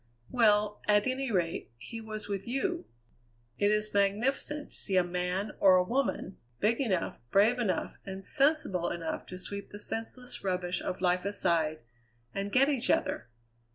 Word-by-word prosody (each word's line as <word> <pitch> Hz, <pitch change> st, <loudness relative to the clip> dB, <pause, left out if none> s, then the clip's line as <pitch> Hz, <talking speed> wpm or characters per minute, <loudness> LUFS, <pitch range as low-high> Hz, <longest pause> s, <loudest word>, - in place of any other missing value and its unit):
"Well, 210 Hz, -3 st, +3 dB
at 210 Hz, 0 st, +4 dB
any 260 Hz, 0 st, -1 dB
rate, 175 Hz, -4 st, -1 dB
he 225 Hz, -, -8 dB
was 215 Hz, -1 st, -6 dB
with 200 Hz, 0 st, -4 dB
you. 255 Hz, -, -1 dB, 0.7 s
It 205 Hz, -, +4 dB
is 210 Hz, 0 st, +1 dB
magnificent 245 Hz, +9 st, 0 dB
to -, -, -3 dB
see 190 Hz, -2 st, 0 dB
a 180 Hz, -, +5 dB
man, 180 Hz, +3 st, -2 dB
or 190 Hz, -2 st, +7 dB
a 180 Hz, -, +5 dB
woman, 235 Hz, -3 st, -1 dB, 0.2 s
big 230 Hz, +5 st, +2 dB
enough, 190 Hz, -10 st, -1 dB
brave 215 Hz, -, +4 dB
enough, 215 Hz, -6 st, -1 dB
and 195 Hz, 0 st, -6 dB
sensible 275 Hz, -, +3 dB
enough 165 Hz, -2 st, -4 dB
to 185 Hz, -, -7 dB
sweep 200 Hz, +2 st, -5 dB
the 205 Hz, -, -9 dB
senseless 230 Hz, +4 st, -4 dB
rubbish 180 Hz, -1 st, -1 dB
of 185 Hz, -, -4 dB
life 180 Hz, 0 st, +2 dB
aside, 170 Hz, -6 st, 0 dB, 0.5 s
and 200 Hz, +1 st, -3 dB
get 265 Hz, +4 st, +5 dB
each 270 Hz, -4 st, 0 dB
other! 120 Hz, -, +1 dB
205 Hz, 160 wpm, -30 LUFS, 185-230 Hz, 0.7 s, or